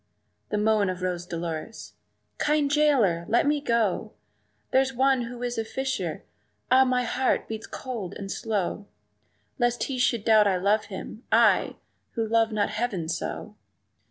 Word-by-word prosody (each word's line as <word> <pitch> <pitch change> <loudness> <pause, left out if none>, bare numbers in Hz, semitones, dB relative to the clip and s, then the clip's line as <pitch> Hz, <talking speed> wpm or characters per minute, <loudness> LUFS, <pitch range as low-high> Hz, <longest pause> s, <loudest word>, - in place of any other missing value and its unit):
The 210 - -1
moan 210 -2 +2
of 185 0 -4
Rose 180 -1 -2
Dolores 170 +4 -5 0.5
"Kind 295 -1 +2
jailer, 265 - +3
let 235 - +3
me 295 0 +1
go! 230 - 0 0.6
There's 265 0 +2
one 265 -1 +3
who 245 +1 -7
is 245 -2 -2
a - - 0
fisher 265 +4 -3 0.5
ah! 260 +1 +7
my 250 -1 +1
heart 255 +2 0
beats 220 0 -6
cold 230 -9 -6
and 195 -1 -6
slow 205 -2 -2 0.7
Lest 240 0 +1
he 265 -2 -3
should 235 -3 +1
doubt 215 -2 +6
I 190 -2 +2
love 205 +4 +2
him 205 +3 -8
I! - - +4 0.4
who 225 -1 -1
love 225 0 +2
not 210 -1 0
heaven 205 -8 -2
so!" - - -4
225 Hz, 155 wpm, -26 LUFS, 200-255 Hz, 0.7 s, ah